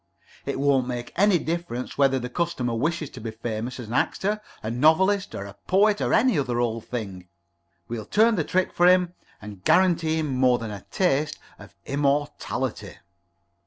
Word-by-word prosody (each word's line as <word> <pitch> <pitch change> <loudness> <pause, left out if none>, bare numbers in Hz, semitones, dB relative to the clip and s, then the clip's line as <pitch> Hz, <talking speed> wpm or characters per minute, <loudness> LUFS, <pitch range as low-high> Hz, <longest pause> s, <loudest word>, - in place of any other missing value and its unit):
It - - -2
won't 135 -3 +2
make 120 -1 -5
any 200 -1 +4
difference 165 -7 -4
whether 135 -1 +3
the 125 -1 -4
customer 125 -4 -2
wishes 155 +5 -2
to 130 - -10
be 115 - -4
famous 115 +2 -5
as 120 - -6
an 115 - -6
actor, 210 +10 0 0.2
a 110 - -3
novelist, 185 - +3
or 100 - -5
a 100 - -9
poet, 205 +3 +3
or - - 0
any 230 - +3
other 125 -3 -1
old 115 -2 -1
thing. 100 -7 -6 0.6
We'll 110 -3 -5
turn 225 +3 +4
the 175 -7 0
trick 185 +4 0
for 175 - +4
him, 180 -1 +4 0.3
and 100 -3 -10
guarantee 170 - +3
him 155 -2 -1
more 125 -1 +3
than 115 -2 -6
a 100 -3 -9
taste 155 -5 0 0.2
of - - -14
immortality." 145 +1 -2
140 Hz, 175 wpm, -25 LUFS, 120-175 Hz, 0.6 s, any